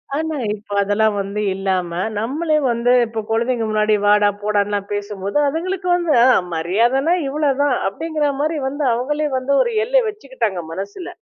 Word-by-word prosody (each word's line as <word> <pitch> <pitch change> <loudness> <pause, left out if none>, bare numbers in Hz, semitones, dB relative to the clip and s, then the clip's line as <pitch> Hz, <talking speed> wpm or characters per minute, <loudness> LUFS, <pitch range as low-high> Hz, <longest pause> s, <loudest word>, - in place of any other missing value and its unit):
ஆனா, 320 +1 -2 0.2
இப்போ 205 0 -9
அதெல்லாம் 205 +1 +1
வந்து 200 +2 -4
இல்லாம 190 -2 -1 0.3
நம்மளே 305 +9 0
வந்து 235 +1 +1
இப்போ 225 0 -5
குழந்தைங்க 230 +1 0
முன்னாடி, 215 0 +2
வாடா 205 0 +5
போடான்னுலாம் 205 -1 -1
பேசும்போது 205 +1 -3
அதுங்களுக்கு 360 +5 -3
வந்து 345 -3 0
அ - - +6 0.3
மரியாதைனா 235 - +1
இவ்வளோதான். 285 -1 +1
அப்படிங்கிற 305 +9 -2
மாதிரி 310 +2 0
வந்து 285 +2 -3
அவங்களே 295 +6 -1
வந்து 260 +2 -2
ஒரு 480 - 0
எல்லை - - +3
வச்சுக்கிட்டாங்க 260 - -3
மனசில. 200 - -6
235 Hz, 145 wpm, -19 LUFS, 205-300 Hz, 0.3 s, அ